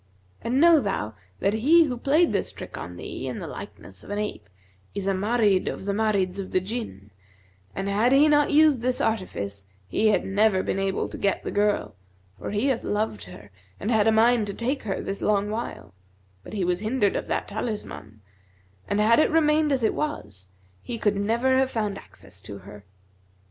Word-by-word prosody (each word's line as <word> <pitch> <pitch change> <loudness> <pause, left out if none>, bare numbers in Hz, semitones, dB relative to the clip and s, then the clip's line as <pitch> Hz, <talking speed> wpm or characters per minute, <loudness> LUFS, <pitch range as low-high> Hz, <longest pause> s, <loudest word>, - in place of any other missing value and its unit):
And 240 +4 0
know 335 0 +7
thou 195 - -2 0.3
that 200 - +2
he 300 +10 +5
who 265 -6 -2
played 295 +8 +2
this - - 0
trick - - -9
on - - -7
thee - - -6
in - - -4
the - - -6
likeness - - -9
of - - -13
an 205 - -3
ape, 210 - -4 0.5
is 200 - -2
a 195 - +1
Marid 205 -1 +2
of - - -8
the 200 - 0
Marids 200 -3 0
of 190 - -5
the 185 - +2
Jinn; 185 - -6 0.6
and 195 - -3
had 210 +5 +2
he 280 +3 +6
not 295 -1 +4
used 300 -4 +5
this 250 +1 0
artifice, 100 - -2 0.2
he 215 - +1
had 210 - +2
never 195 -1 +2
been 195 - -2
able 195 0 -1
to - - -8
get 200 -1 0
the - - -4
girl; 205 - 0 0.5
for - - -5
he 210 +5 -1
hath 265 -4 0
loved 205 - -2
her 100 +3 -13 0.3
and 220 - -2
had 220 -2 +3
a - - +6
mind 225 0 +4
to 200 - -4
take 260 +4 -1
her 195 -3 -3
this 195 - -5
long 205 0 +1
while, 215 - -5 0.5
but - - -12
he 195 -4 -1
was 180 0 0
hindered 215 -1 +1
of - - -3
that - - -2
talisman; 205 - -6 0.7
and 205 - 0
had 225 +4 +5
it - - +4
remained 305 -1 +3
as 265 -4 +1
it 220 - +2
was, 195 - -4 0.3
he 240 - -5
could 210 -2 +1
never 235 +6 +2
have 265 0 +2
found 210 -5 -2
access - - -12
to 100 - -9
her. 100 +1 -12
210 Hz, 200 wpm, -25 LUFS, 195-245 Hz, 0.7 s, know